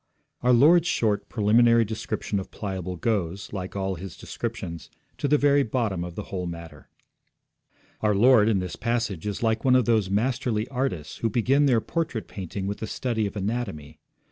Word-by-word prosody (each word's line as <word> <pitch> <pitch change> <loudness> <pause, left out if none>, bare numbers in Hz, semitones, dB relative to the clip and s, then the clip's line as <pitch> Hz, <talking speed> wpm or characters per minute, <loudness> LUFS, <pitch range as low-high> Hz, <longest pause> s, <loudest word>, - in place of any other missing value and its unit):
Our 125 - +3
Lord's 160 +8 +6
short 105 - 0
preliminary 115 +2 +4
description 105 -1 -3
of 95 - -7
Pliable 95 -3 -5
goes, 100 -3 -2
like 95 -1 -5
all 95 -1 -1
His 95 +1 -8
descriptions, 85 -2 -6 0.3
to - - 0
the 150 +2 +4
very 145 0 +4
bottom 110 -8 -1
of 85 -1 -7
the 105 - -4
whole 90 -2 -2
matter. 85 -1 -9 1.1
Our 105 -1 +2
Lord 115 0 +6
in 105 - +2
this 90 -1 -3
passage 115 -6 -2
is 105 +2 -3
like 110 0 +1
one 130 -1 +4
of 125 -3 +4
those 110 -5 +2
masterly 110 +1 0
artists 125 - -3
who 115 - 0
begin 135 +6 +3
their 120 -4 +3
portrait 160 -8 -3
painting 95 0 -6
with 100 +1 -3
the 110 - -4
study 110 -2 -1
of 100 - -8
anatomy. 100 -8 -4
110 Hz, 175 wpm, -25 LUFS, 95-120 Hz, 1.1 s, Lord's